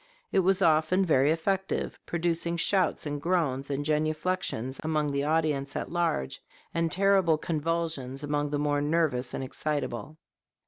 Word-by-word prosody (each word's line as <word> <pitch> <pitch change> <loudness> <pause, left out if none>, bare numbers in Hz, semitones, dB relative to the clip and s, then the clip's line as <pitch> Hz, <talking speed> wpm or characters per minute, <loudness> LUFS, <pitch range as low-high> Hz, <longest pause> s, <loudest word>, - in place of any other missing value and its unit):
It - - +3
was 190 +1 +3
often 160 +4 +3
very 140 -4 +4
effective, 190 +4 -1
producing 170 0 -1
shouts 185 -1 +1
and 145 -1 -3
groans 145 -6 0
and 140 +1 -2
genuflections 155 -3 -1
among 155 -2 0
the 140 0 0
audience 150 -2 0
at - - -3
large, 165 - -1 0.3
and 165 -1 0
terrible 190 -3 +3
convulsions 155 -4 -2
among 145 0 -1
the 145 - -1
more 145 0 +1
nervous 145 -5 +1
and - - -3
excitable. 145 +1 -3
155 Hz, 140 wpm, -28 LUFS, 145-170 Hz, 0.3 s, very